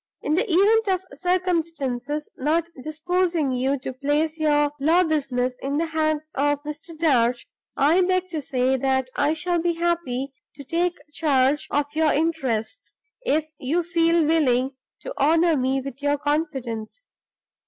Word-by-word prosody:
"In 300 - 0
the 390 +5 +1
event 425 +5 +4
of 375 -1 +1
circumstances 315 -6 -1
not 315 +5 0
disposing 320 0 0
you 260 +2 0
to 260 - -5
place 300 +4 -1
your 295 -1 +2
law 330 +6 +4
business 265 -6 0
in 280 +2 -2
the 330 - +1
hands 310 -1 0
of 290 +1 0
Mr. 300 +2 -7
Darch, 250 -7 +2 0.3
I 310 +7 +4
beg 370 0 +1
to 320 -3 -3
say 260 -1 +1
that 265 0 0
I 290 +2 +1
shall 345 +2 -1
be 345 0 +1
happy 330 -6 -2 0.2
to 280 - -9
take 345 +5 -1 0.2
charge 280 -2 +2
of 290 0 +1
your 315 -1 +2
interests, 300 - -2 0.3
if 305 +2 +2
you 320 +7 0
feel 335 -1 +2
willing 270 -5 +2 0.3
to - - -6
honor 325 +3 +3
me 265 0 +1
with 275 0 -8
your 290 0 +1
confidence. 290 - -3
300 Hz, 150 wpm, -23 LUFS, 270-335 Hz, 0.3 s, event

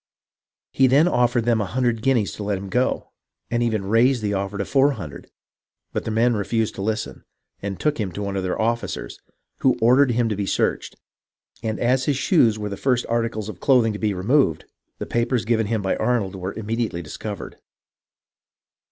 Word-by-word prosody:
Then 135 +4 +6
he 180 - +1
offered 120 -1 +2
them 115 -2 +2
a - - -1
hundred 120 -1 0
guineas 120 -5 +1
to 105 - -6
let 100 -1 -1
him 95 +1 -7
go, 125 +5 0 0.4
and 120 0 +1
even 110 -4 0
raised 115 +3 +3
the 105 -1 0
offer 100 +1 -2
to 100 - -2
four 140 +1 +3
hundred; 85 - -9 0.6
but - - -2
the - - -2
men 115 +2 +2
refused 110 +1 -1
to - - -7
listen, 110 +2 -3 0.4
and 100 -1 -4
took 150 -3 0
him 100 -4 -2
to 100 - -4
one 100 -1 -3
of 95 - -1
their 95 -1 -2
officers, 115 - -2 0.4
who 130 - +3
ordered 125 +4 +5
him 120 -1 +1
to 110 - -1
be 100 0 -3
searched; - - -1 0.7
and 110 -2 -3
as 130 +2 +2
his 145 -3 +1
shoes 125 - +3
were 105 -1 -4
the 100 - -5
first 125 -2 +1
articles 115 -2 -1
of 105 -5 -8
clothing 120 -5 +3
to 105 - -6
be 105 -3 0
removed, 95 - +2 0.3
the - - -5
papers 120 0 0
given 110 -2 +1
him 110 -1 -1
by 95 - +1
Arnold 110 -6 0
were 95 +1 -5
immediately 110 -4 -3
discovered. 100 +6 -7
110 Hz, 195 wpm, -23 LUFS, 100-125 Hz, 0.7 s, Then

